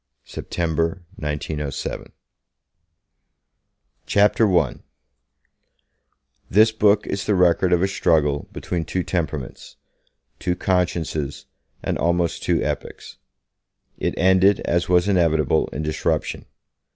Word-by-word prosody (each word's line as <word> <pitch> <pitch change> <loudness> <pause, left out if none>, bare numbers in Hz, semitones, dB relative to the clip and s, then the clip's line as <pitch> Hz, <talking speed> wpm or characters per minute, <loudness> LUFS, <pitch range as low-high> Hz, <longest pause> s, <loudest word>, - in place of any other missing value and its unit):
September 85 +2 -2
1907 75 -1 -4 2.0
CHAPTER 105 -1 +3
I 75 -7 0 1.7
THIS 110 +3 +5
book 105 -1 +3
is 100 0 -4
the 105 - +2
record 90 0 +3
of 90 0 +3
a - - +3
struggle 75 -7 +1
between 85 -2 -3
two 90 +3 -2
temperaments, 80 -7 -4 0.6
two 90 - -1
consciences 85 -6 -1 0.4
and - - -2
almost 85 0 0
two - - +1
epochs. - - -5 0.8
It - - -1
ended, 95 +2 +4
as 85 +1 -1
was 90 +1 +3
inevitable, 80 -7 +2
in 75 - -5
disruption. 75 0 -2
85 Hz, 100 wpm, -22 LUFS, 80-95 Hz, 2.0 s, THIS